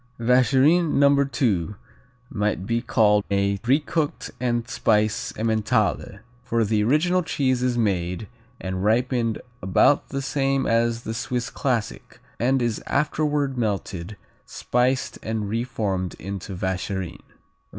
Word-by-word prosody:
Vacherin 135 Hz, +7 st, +3 dB
No. 140 Hz, 0 st, +4 dB
II 105 Hz, -, +1 dB, 0.6 s
might 105 Hz, -4 st, -1 dB
be 115 Hz, +2 st, 0 dB
called 105 Hz, -4 st, +3 dB
a 100 Hz, 0 st, +1 dB
re 130 Hz, +5 st, +3 dB
cooked 155 Hz, 0 st, -3 dB
and 120 Hz, -1 st, -1 dB
spiced 110 Hz, -2 st, 0 dB
Emmentaler, 110 Hz, -1 st, 0 dB, 0.2 s
for 115 Hz, -2 st, 0 dB
the 105 Hz, 0 st, +1 dB
original 165 Hz, +10 st, +2 dB
cheese 130 Hz, -6 st, 0 dB
is 125 Hz, -1 st, 0 dB
made, 95 Hz, -3 st, -1 dB, 0.3 s
and 95 Hz, 0 st, -4 dB
ripened 115 Hz, +1 st, +1 dB, 0.2 s
about 95 Hz, +10 st, +3 dB
the 135 Hz, 0 st, -3 dB
same 135 Hz, 0 st, 0 dB
as 115 Hz, 0 st, +1 dB
the 110 Hz, -, -4 dB
Swiss 120 Hz, 0 st, -3 dB
classic 125 Hz, -5 st, -3 dB, 0.2 s
and 130 Hz, +2 st, +2 dB
is 115 Hz, -3 st, -1 dB
afterward 145 Hz, -3 st, 0 dB
melted, 100 Hz, -3 st, -3 dB, 0.3 s
spiced 125 Hz, +2 st, -1 dB
and 110 Hz, -2 st, -3 dB
reformed 105 Hz, -5 st, -2 dB
into 95 Hz, 0 st, -6 dB
Vacherin. 95 Hz, -1 st, -3 dB
115 Hz, 120 wpm, -24 LUFS, 105-130 Hz, 0.6 s, No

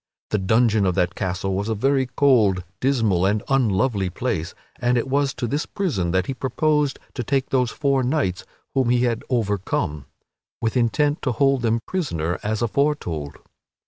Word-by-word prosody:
The 105 Hz, -, +1 dB
dungeon 110 Hz, +1 st, +3 dB
of 90 Hz, -, 0 dB
that 90 Hz, 0 st, +1 dB
castle 95 Hz, 0 st, -2 dB
was 100 Hz, +3 st, -2 dB
a 110 Hz, -, 0 dB
very 135 Hz, +4 st, +1 dB
cold, 120 Hz, -8 st, +3 dB, 0.2 s
dismal, 115 Hz, -9 st, +2 dB
and 100 Hz, +2 st, +1 dB
unlovely 110 Hz, -6 st, +1 dB
place, 95 Hz, -3 st, -3 dB, 0.2 s
and 120 Hz, 0 st, +2 dB
it 120 Hz, -, -1 dB
was 140 Hz, +1 st, +1 dB
to -, -, -3 dB
this 145 Hz, +6 st, -2 dB
prison 115 Hz, -, -1 dB
that 95 Hz, +1 st, +1 dB
he 135 Hz, -, -3 dB
proposed 145 Hz, +2 st, 0 dB, 0.2 s
to 125 Hz, -, -3 dB
take 135 Hz, +2 st, -1 dB
those 125 Hz, -2 st, +2 dB
four 140 Hz, -1 st, +1 dB
knights 125 Hz, -, 0 dB, 0.3 s
whom 130 Hz, -3 st, +2 dB
he 125 Hz, 0 st, +3 dB
had 115 Hz, -2 st, 0 dB
overcome, 100 Hz, -, -1 dB, 0.5 s
with 115 Hz, +1 st, -1 dB
intent 145 Hz, +5 st, +1 dB
to 130 Hz, -, 0 dB
hold 135 Hz, +1 st, +2 dB
them 115 Hz, -1 st, +1 dB
prisoner 90 Hz, -, -2 dB
as 110 Hz, +2 st, -1 dB
aforetold. 110 Hz, -, -1 dB
120 Hz, 170 wpm, -23 LUFS, 95-135 Hz, 0.5 s, dungeon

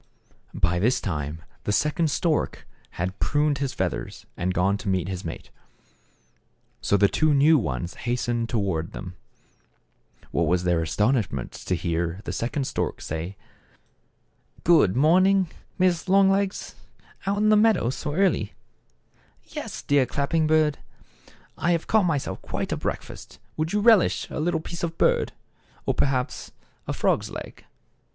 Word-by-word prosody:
By 85 Hz, +1 st, +1 dB
this 120 Hz, +6 st, +2 dB
time 80 Hz, -2 st, -4 dB, 0.2 s
the -, -, -1 dB
second 150 Hz, +7 st, +1 dB
stork 155 Hz, +1 st, -1 dB, 0.3 s
had 90 Hz, +3 st, -3 dB
pruned 145 Hz, -1 st, +1 dB
his 140 Hz, -2 st, -1 dB
feathers, 95 Hz, -8 st, -3 dB
and 90 Hz, +2 st, -1 dB
gone 90 Hz, +2 st, +2 dB
to 105 Hz, -, -4 dB
meet 95 Hz, -2 st, 0 dB
his 95 Hz, -1 st, -4 dB
mate. 80 Hz, -, -7 dB, 1.3 s
So 100 Hz, -, +2 dB
the 100 Hz, +1 st, +5 dB
two 155 Hz, +6 st, +2 dB
new 150 Hz, +2 st, +5 dB
ones 75 Hz, -, -3 dB, 0.2 s
hastened 120 Hz, -1 st, -1 dB
toward 95 Hz, -8 st, -1 dB
them. 95 Hz, -2 st, -7 dB, 1.2 s
What -, -, +1 dB
was 90 Hz, 0 st, +2 dB
their 85 Hz, -2 st, +2 dB
astonishment 105 Hz, -, 0 dB
to 90 Hz, -, -3 dB
hear 85 Hz, +1 st, -2 dB
the 90 Hz, -, -4 dB
second 120 Hz, +8 st, -2 dB
stork -, -, -2 dB
say: 80 Hz, +5 st, -5 dB, 0.4 s
— -, -, -42 dB
" -, -, -31 dB
Good 155 Hz, -, +5 dB
morning, 185 Hz, +6 st, +4 dB, 0.3 s
Mrs. 180 Hz, -1 st, +2 dB
Longlegs; 195 Hz, 0 st, +2 dB, 0.5 s
out 200 Hz, +1 st, +1 dB
on 215 Hz, +1 st, +3 dB
the 215 Hz, -, +6 dB
meadow 210 Hz, -, +3 dB
so 145 Hz, +3 st, -4 dB
early? 160 Hz, -, +1 dB, 0.3 s
" -, -, -41 dB
" -, -, -36 dB
Yes, -, -, -5 dB
dear 140 Hz, -3 st, +3 dB
Clapping 145 Hz, +5 st, 0 dB
beak, 155 Hz, -1 st, +3 dB, 0.8 s
I 175 Hz, -, +2 dB
have 165 Hz, -, -1 dB
caught 220 Hz, -3 st, +3 dB
my 165 Hz, -4 st, +2 dB
self 135 Hz, -, -5 dB
quite -, -, -4 dB
a -, -, +1 dB
breakfast. -, -, -6 dB, 0.2 s
Would 155 Hz, +1 st, -2 dB
you 210 Hz, -, +1 dB
relish 220 Hz, -4 st, +4 dB
a -, -, -4 dB
little 160 Hz, 0 st, 0 dB
piece 170 Hz, +1 st, -7 dB
of 165 Hz, -1 st, -3 dB
bird, -, -, +2 dB, 0.5 s
or, -, -, +1 dB
perhaps, 130 Hz, -1 st, -1 dB, 0.3 s
a -, -, -1 dB
frog's -, -, +1 dB
leg -, -, -9 dB
130 Hz, 155 wpm, -25 LUFS, -, 1.3 s, the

